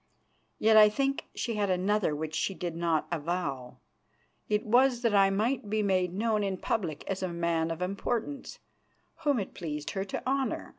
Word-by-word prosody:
Yet 220 Hz, 0 st, +5 dB
I 210 Hz, -1 st, +9 dB
think 275 Hz, +5 st, -1 dB
she 235 Hz, -, -2 dB
had 205 Hz, -1 st, +1 dB
another 185 Hz, -2 st, +1 dB
which 155 Hz, +1 st, -4 dB
she 185 Hz, +4 st, -1 dB
did 175 Hz, -2 st, -4 dB
not 165 Hz, -2 st, 0 dB
avow. 150 Hz, -6 st, -3 dB, 0.7 s
It 210 Hz, 0 st, +1 dB
was 245 Hz, +2 st, +3 dB
that 230 Hz, -3 st, +2 dB
I 195 Hz, -1 st, +5 dB
might 215 Hz, +3 st, 0 dB
be 215 Hz, 0 st, +1 dB
made 185 Hz, -3 st, +1 dB
known 215 Hz, +3 st, 0 dB
in 195 Hz, -1 st, -1 dB
public 170 Hz, -7 st, -2 dB
as 190 Hz, -1 st, -3 dB
a 185 Hz, -, 0 dB
man 170 Hz, -1 st, 0 dB
of 165 Hz, +2 st, -3 dB
importance 230 Hz, +8 st, -3 dB, 0.6 s
whom 290 Hz, -3 st, +1 dB
it 200 Hz, -, -4 dB
pleased 150 Hz, -3 st, -5 dB
her 195 Hz, -, -2 dB
to 200 Hz, -, -5 dB
honour. 270 Hz, 0 st, -1 dB
195 Hz, 180 wpm, -29 LUFS, 170-220 Hz, 0.7 s, I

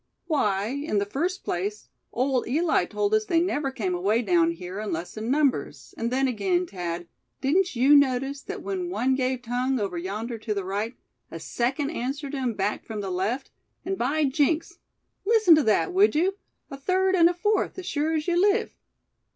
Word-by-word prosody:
"Why, 210 Hz, -, +1 dB
in 280 Hz, -4 st, -2 dB
the 200 Hz, -, +1 dB
first 345 Hz, -, -2 dB
place, 205 Hz, +4 st, -3 dB, 0.2 s
old 255 Hz, 0 st, 0 dB
Eli 315 Hz, +7 st, +2 dB
told 415 Hz, 0 st, -1 dB
us 435 Hz, 0 st, +3 dB
they 340 Hz, -5 st, +2 dB
never 305 Hz, -5 st, 0 dB
came 210 Hz, -9 st, -2 dB
away 205 Hz, +7 st, +1 dB
down 175 Hz, -5 st, +3 dB
here 180 Hz, +3 st, -6 dB
unless 180 Hz, -5 st, -4 dB
in 220 Hz, +2 st, -4 dB
numbers; 280 Hz, -1 st, 0 dB
and 230 Hz, -, -2 dB
then 265 Hz, +1 st, +2 dB
again, 355 Hz, -, 0 dB
Thad, 175 Hz, -, -5 dB, 0.3 s
didn't 355 Hz, +5 st, +1 dB
you 265 Hz, +5 st, +6 dB
notice 275 Hz, 0 st, +2 dB
that 400 Hz, +5 st, -7 dB
when 370 Hz, -3 st, -3 dB
one 265 Hz, -7 st, +1 dB
gave 255 Hz, -1 st, -1 dB
tongue 250 Hz, +2 st, 0 dB
over 190 Hz, -4 st, -2 dB
yonder 215 Hz, +6 st, -4 dB
to 215 Hz, -1 st, -3 dB
the 200 Hz, -2 st, -3 dB
right, 205 Hz, +5 st, -3 dB, 0.3 s
a -, -, -7 dB
second 270 Hz, +5 st, -1 dB
answered 280 Hz, +1 st, -4 dB
him 255 Hz, -5 st, -1 dB
back 200 Hz, +1 st, -1 dB
from 215 Hz, -2 st, -5 dB
the 195 Hz, -2 st, -4 dB
left; 210 Hz, +9 st, -2 dB, 0.3 s
and 385 Hz, -, -1 dB
by 310 Hz, -3 st, 0 dB
jinks! 300 Hz, +4 st, 0 dB, 0.4 s
listen 435 Hz, -4 st, +5 dB
to 310 Hz, -, +6 dB
that, 220 Hz, -, +2 dB
would 390 Hz, -2 st, +4 dB
you, 370 Hz, +5 st, +2 dB, 0.4 s
a 275 Hz, -, -6 dB
third 375 Hz, +6 st, +1 dB
and 340 Hz, -2 st, +6 dB
a -, -, -1 dB
fourth, 415 Hz, +4 st, 0 dB
as 375 Hz, -, -6 dB
sure 310 Hz, +1 st, 0 dB
as 305 Hz, +1 st, -2 dB
you 350 Hz, 0 st, +2 dB
live! 415 Hz, +3 st, +2 dB
270 Hz, 190 wpm, -26 LUFS, 215-335 Hz, 0.4 s, you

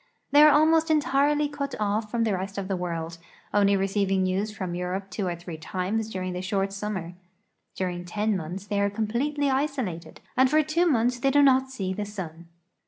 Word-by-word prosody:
' -, -, -47 dB
They 290 Hz, +1 st, +7 dB
are 305 Hz, -, +9 dB
almost 315 Hz, +2 st, +4 dB
entirely 295 Hz, -1 st, +2 dB
cut 285 Hz, -1 st, -4 dB
off 210 Hz, +1 st, -1 dB
from 230 Hz, +1 st, 0 dB
the 220 Hz, -3 st, +1 dB
rest 195 Hz, +2 st, -4 dB
of 195 Hz, -1 st, -3 dB
the 195 Hz, -, -1 dB
world, 170 Hz, -2 st, -4 dB, 0.3 s
only 200 Hz, -1 st, +4 dB
receiving 195 Hz, 0 st, +1 dB
news 190 Hz, +3 st, 0 dB
from 185 Hz, -4 st, -5 dB
Euroj^e 180 Hz, +2 st, -3 dB
two 190 Hz, 0 st, -2 dB
or 175 Hz, -, -2 dB
three 170 Hz, -1 st, -8 dB
times 195 Hz, +7 st, -2 dB
during 185 Hz, -3 st, -4 dB
the 180 Hz, -, -4 dB
short 195 Hz, +1 st, -1 dB
summer. 195 Hz, -4 st, -4 dB, 0.6 s
During 180 Hz, -2 st, -3 dB
ten 210 Hz, +4 st, -1 dB
months 180 Hz, +3 st, -5 dB
they 200 Hz, 0 st, -1 dB
are 200 Hz, -, +2 dB
completely 255 Hz, +8 st, -1 dB
isolated, 260 Hz, -, -2 dB, 0.2 s
and 260 Hz, +1 st, +4 dB
for 310 Hz, +2 st, +4 dB
two 335 Hz, +4 st, +1 dB
months 245 Hz, -4 st, +2 dB
they 275 Hz, -, +2 dB
do 285 Hz, +1 st, +5 dB
not 265 Hz, -1 st, +4 dB
see 195 Hz, -8 st, -3 dB
the 205 Hz, +2 st, -3 dB
sun. 170 Hz, -5 st, -8 dB
205 Hz, 200 wpm, -26 LUFS, 185-265 Hz, 0.6 s, are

